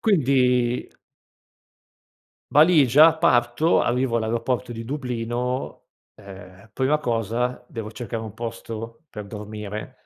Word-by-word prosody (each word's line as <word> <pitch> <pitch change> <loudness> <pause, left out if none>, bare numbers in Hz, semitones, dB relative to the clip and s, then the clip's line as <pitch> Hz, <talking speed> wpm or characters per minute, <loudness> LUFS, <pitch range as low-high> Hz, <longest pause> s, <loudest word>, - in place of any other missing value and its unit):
quindi 125 - +2 1.6
valigia 150 0 +6
parto, 125 0 +3
arrivo 125 0 0
all'aeroporto 115 +2 -1
di 115 0 -6
Dublino, 125 -1 -4 0.3
ehm, 95 0 -13
prima 130 +5 +1
cosa 120 -1 -2
devo 110 -3 -7
cercare 115 -1 -5
un 110 -2 -8
posto 115 +3 -7
per 105 -2 -8
dormire. 105 0 -7
120 Hz, 95 wpm, -23 LUFS, 110-130 Hz, 1.6 s, valigia